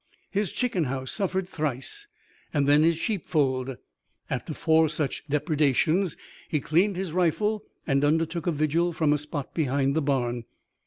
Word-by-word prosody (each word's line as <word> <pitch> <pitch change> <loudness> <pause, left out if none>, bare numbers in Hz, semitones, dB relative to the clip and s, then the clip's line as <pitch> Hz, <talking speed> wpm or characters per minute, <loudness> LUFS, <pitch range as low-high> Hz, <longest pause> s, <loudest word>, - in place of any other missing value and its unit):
His 205 -2 0
chicken 215 -10 0
house 130 0 -3
suffered 190 -2 -1
thrice 155 - -3 0.4
and 145 -2 +1
then 145 +1 +6
his 165 0 +3
sheep 200 0 -1
fold. 130 -4 0 0.5
After - - -3
four 160 0 +3
such 150 -2 -2
depredations 155 +4 +2 0.3
he 150 - +1
cleaned 180 +8 +2
his 185 -2 -3
rifle 205 +5 +1 0.2
and 140 -1 +2
undertook 165 +3 +1
a - - +3
vigil 160 +3 +1
from 155 -2 +2
a - - +2
spot 150 -1 -5
behind 140 -2 +1
the 160 - +2
barn. 120 -4 0
155 Hz, 155 wpm, -26 LUFS, 140-175 Hz, 0.5 s, then